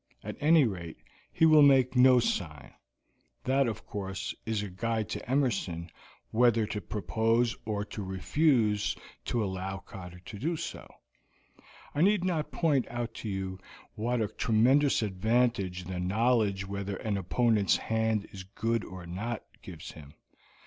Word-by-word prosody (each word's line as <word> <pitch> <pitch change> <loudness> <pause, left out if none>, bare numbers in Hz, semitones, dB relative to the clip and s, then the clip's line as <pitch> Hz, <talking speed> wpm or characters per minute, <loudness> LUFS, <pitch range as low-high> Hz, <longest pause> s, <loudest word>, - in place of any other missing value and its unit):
At - - -5
any 155 +1 +5
rate, 85 -7 -5 0.3
he 160 - +3
will 155 -1 +7
make 135 -3 +5
no 125 0 +7
sign 80 - -3 0.7
that, 135 0 +2
of 115 - -4
course, 95 -1 -4
is 110 -2 0
a - - -4
guide 110 +3 -2
to - - -6
Emerson 100 -11 0 0.4
whether 115 -1 +4
to 105 0 -4
propose 115 +5 0
or 105 -1 -2
to 105 - -7
refuse 105 - +1 0.3
to 120 -2 0
allow 95 0 -3
Cotter 90 -3 -10
to 90 +3 -10
do 165 +8 -1
so. - - -7 1.0
I 145 - 0
need 200 0 +4
not 170 -5 -1
point 150 -6 +1
out 120 -1 -4
to 110 - -4
you 95 -1 -4 0.3
what 120 +2 -1
a 110 - +1
tremendous 125 +6 +3
advantage 100 -2 0
the 90 0 -5
knowledge 100 0 +1
whether 100 0 -4
an 105 +1 -2
opponent's 105 +2 +2
hand 110 -2 0
is 95 - -8
good 115 +4 -2
or 95 -2 -9
not 105 +7 -4 0.2
gives - - -9
him. 75 -2 -13
110 Hz, 150 wpm, -29 LUFS, 95-125 Hz, 1.0 s, will